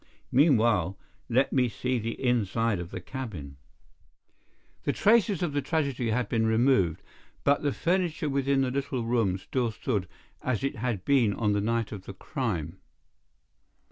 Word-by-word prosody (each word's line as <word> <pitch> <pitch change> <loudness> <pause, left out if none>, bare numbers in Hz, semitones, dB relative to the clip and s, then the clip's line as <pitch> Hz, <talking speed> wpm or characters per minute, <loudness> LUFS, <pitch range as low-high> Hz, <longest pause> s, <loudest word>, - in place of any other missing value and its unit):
Meanwhile, 115 - +3 0.3
let 130 +3 +2
me 125 -2 +3
see 125 +3 -1
the 115 +1 -4
inside 115 -4 +1
of 85 -1 -6
the 95 - -6
cabin." 90 - -7 1.3
The - - 0
traces 210 -4 +3
of 160 -5 -1
the 145 - +1
tragedy 140 -5 -1
had 125 +2 0
been 110 -1 +1
removed, 110 - +2 0.4
but 140 0 +3
the 145 - +1
furniture 170 -1 0
within 140 -1 +1
the 130 -1 0
little 135 -2 -2
room 115 -5 +1
still 120 +5 -1
stood 105 -3 -2 0.3
as 130 -3 -1
it 135 - -1
had 110 -5 -2
been 125 -7 +3
on 105 -3 +1
the 100 - +1
night 115 +1 -1
of 100 -3 -7
the 100 - -8
crime. 95 - -3
120 Hz, 155 wpm, -28 LUFS, 105-135 Hz, 1.3 s, Meanwhile